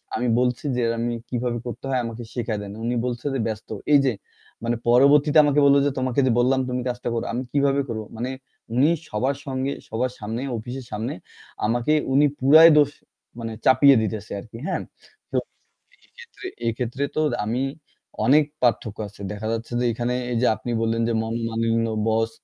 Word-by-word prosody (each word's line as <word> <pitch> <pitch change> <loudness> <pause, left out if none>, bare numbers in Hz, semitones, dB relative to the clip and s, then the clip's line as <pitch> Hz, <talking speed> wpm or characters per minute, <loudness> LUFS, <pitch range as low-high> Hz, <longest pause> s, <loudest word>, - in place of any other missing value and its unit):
আমি 125 - -1
বলছি 125 +2 0
যে, 125 - +1 0.2
"আমি 120 0 -1 0.2
কিভাবে 120 -1 -1
করতে 120 +2 -6
হয় 130 -2 +1
আমাকে 115 +1 -6
শিখায় 115 -3 -2
দেন"। 100 -1 -7
উনি 120 +1 -1
বলছেন 125 +3 -3
যে, - - -1
"ব্যস্ত।" 110 -1 -5 0.2
এই 145 - +8
যে 130 - +3 0.5
মানে 115 +1 0
পরবর্তীতে 145 +5 +5
আমাকে 145 0 +3
বলল 140 0 +6
যে, 145 - +2
"তোমাকে 130 0 0
যে 125 - +3
বললাম 130 +2 +3
তুমি 125 0 -2
কাজটা 120 0 -3
করো।" 115 - -2
আমি 120 - -1
কিভাবে 140 -1 +2
করব? 110 -2 -3
মানে 125 +3 -3 0.5
উনি 135 +5 +5 0.2
সবার 130 +6 0
সঙ্গে 135 +1 -2 0.2
সবার 125 +3 -1
সামনে 110 +3 -4 0.2
অফিসের 125 +4 -7
সামনে 110 +4 -3 0.5
আমাকে 120 +6 +1 0.2
উনি 145 +2 +5
পুরাই 155 +5 +8
দোষ 145 -1 +5 0.5
মানে 115 -1 -4
চাপিয়ে 140 +1 +7
দিতেছে 110 -1 -4
আরকি। 110 +2 -11
হ্যাঁ? - - -1 0.5
তো - - 0 0.7
এক্ষেত্রে 470 -6 -12 0.2
এক্ষেত্রে 125 +4 -2
তো 155 - +2 0.2
আমি 120 +5 -1 0.6
অনেক 150 +3 +6 0.2
পার্থক্য 110 -3 +1
আছে। 100 0 -18
দেখা 105 +1 -6
যাচ্ছে 115 +1 -4
যে, 125 - 0
এখানে 120 +2 -2 0.2
এই - - 0
যে - - +4
আপনি 115 +2 -6
বললেন 115 0 0
যে 115 - +1
মনোমালিন্য 115 0 -1 0.2
বস 110 0 +1
120 Hz, 175 wpm, -23 LUFS, 115-135 Hz, 0.7 s, এই